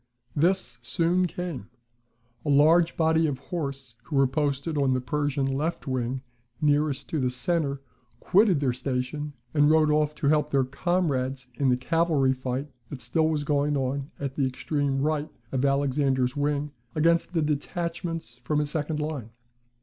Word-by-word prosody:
This 170 -5 +1
soon 175 +8 +2
came. 170 - -5 0.7
A 150 - -3
large 160 +4 +5
body 160 0 +3
of 140 -3 -2
horse, 135 -4 -5
who 150 - -4
were 135 0 +5
posted 145 +2 -1
on 135 -3 +2
the - - +1
Persian 145 +1 -1
left 145 +6 -2
wing 130 -1 -2 0.4
nearest 145 -2 +1
to 155 - -1
the 130 -2 +1
centre, 140 +1 -1 0.4
quitted 190 - +4
their 130 -3 +1
station, 135 +3 -3 0.2
and 145 -1 +4
rode 155 -1 +4
off 150 0 +2
to 145 - -1
help 150 -1 +2
their 140 -2 +3
comrades 135 -3 -1
in 135 +2 +1
the 125 - +3
cavalry 150 -1 +2
fight 130 +2 -3 0.2
that 140 - -6
still 160 +4 +1
was 150 -2 0
going 145 0 +1
on 135 +1 -2
at 140 -2 -3
the 135 -1 +1
extreme 140 +1 -1
right 155 0 0 0.2
of 130 -1 0
Alexander's 140 -2 +1
wing 145 0 -1 0.2
against 170 +3 +2
the 165 -3 +2
detachments 165 - -3
from 150 +4 -1
his 150 0 0
second 155 0 -2
line. 150 -7 -4
145 Hz, 160 wpm, -26 LUFS, 135-155 Hz, 0.7 s, large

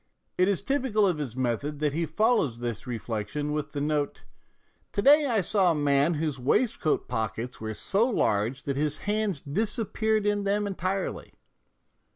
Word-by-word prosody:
It 185 - +3
is 200 -3 0
typical 260 -7 +1
of 175 -5 +1
his 130 -6 -4
method 130 +4 -1
that 150 -1 0
he 165 +1 -1
follows 185 - +2
this 120 -1 -5
reflection 120 +5 -3
with 150 0 -3
the 145 - -2
note, 150 -1 -1 0.7
"To 200 - 0
day 290 +1 +6
I 225 -5 +2
saw 190 0 +2
a - - 0
man 145 +2 +2
whose 150 -3 -2
waistcoat 155 - +1
pockets 115 +1 -3
were 110 -1 -4
so 210 - +2
large 120 - 0
that 140 -1 -2
his 150 0 0
hands 210 -5 0
disappeared 215 - 0
in 205 -1 +1
them 205 +1 +1
entirely." 195 0 -3
155 Hz, 165 wpm, -27 LUFS, 135-205 Hz, 0.7 s, day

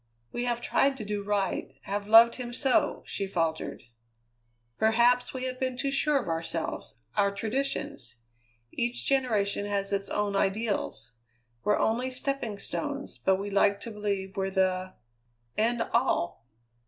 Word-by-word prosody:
"We 240 - -2
have 240 -1 0
tried 270 +2 +2
to 215 - -6
do 205 0 -2
right 200 -8 -1
have 200 +3 -3
loved 230 +2 +8
him 240 -2 -5
so," 290 +4 +1
she 195 - -3
faltered. 165 -6 -2 1.0
"Perhaps 240 +3 +4
we 260 -1 -5
have 255 0 -3
been 255 -2 -1
too 275 +1 -1
sure 290 +1 +2
of 240 - -6
ourselves, 165 -6 -3 0.2
our 200 -1 +4
traditions. 215 - -3 0.6
Each 240 0 -1
generation 215 -7 +1
has 200 -1 -1
its 195 0 -1
own 205 -1 0
ideals. 195 - -1 0.5
We're 210 - +3
only 240 +4 +1
stepping 255 -4 -2
stones, 285 +7 -4
but 190 - +3
we 200 +2 -4
like 200 0 +3
to 230 - -6
believe 200 -2 -3
we're 195 0 0
the 185 -1 0 0.6
end 230 +2 +2
all!" 120 - +1
210 Hz, 145 wpm, -29 LUFS, 195-250 Hz, 1.0 s, loved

